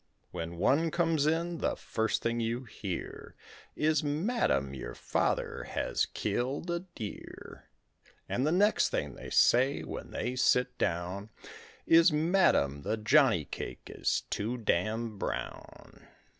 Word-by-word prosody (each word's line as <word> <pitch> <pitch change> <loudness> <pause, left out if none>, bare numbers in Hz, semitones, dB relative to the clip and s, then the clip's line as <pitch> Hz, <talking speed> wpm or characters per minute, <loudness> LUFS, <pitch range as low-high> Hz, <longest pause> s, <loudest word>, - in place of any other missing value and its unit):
When 85 +1 -5
one 155 - +3
comes 165 -3 +1
in, 170 +2 0
the - - 0
first 110 0 -2
thing 115 0 0
you 115 +2 -2
hear 100 -6 -6 0.4
Is, 155 -1 +2
"Madam, 150 - 0
your 65 -2 -7
father - - -1
has - - -1
killed 135 +8 -2
a 170 - 0
deer"; 170 - -9 0.6
And 125 - -1
the 155 - +2
next 205 +5 +3
thing - - -2
they - - -9
say 130 +4 +4
when - - -7
they 125 +1 -3
sit 125 0 +2
down 90 +5 -2 0.6
Is, 165 +1 +6
"Madam, 150 - +2
the 110 - -2
jonny 110 - +4
cake - - -7
is - - 0
too 115 +5 -2
damned 110 +1 -1
brown." - - -6
125 Hz, 130 wpm, -30 LUFS, 105-160 Hz, 0.6 s, Is